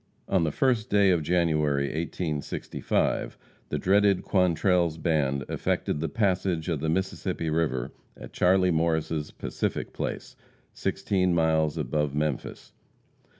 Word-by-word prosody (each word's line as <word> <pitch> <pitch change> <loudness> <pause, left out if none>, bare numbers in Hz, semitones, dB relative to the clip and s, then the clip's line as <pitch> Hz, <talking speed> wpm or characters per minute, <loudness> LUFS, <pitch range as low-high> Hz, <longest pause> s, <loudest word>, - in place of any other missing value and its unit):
On 95 -3 +2
the 80 - 0
first 120 - +1
day 100 -2 +4
of 85 -3 +2
January, 75 -4 +1
1865, 80 0 -2 0.3
the - - -1
dreaded 100 0 +3
Quantrell's 90 -3 +2
band 75 -5 0
effected - - -1
the 80 0 -2
passage 90 -4 0
of 80 -4 -1
the 80 +2 -1
Mississippi 85 -2 -2
river 75 -6 -1 0.3
at - - -11
Charlie 90 0 +3
Morris' 80 -2 0
"Pacific - - -4
Place," - - -5 0.4
sixteen 90 -3 0
miles 80 -1 +2
above 75 0 -1
Memphis. 75 -2 -3
80 Hz, 120 wpm, -27 LUFS, 75-90 Hz, 0.4 s, day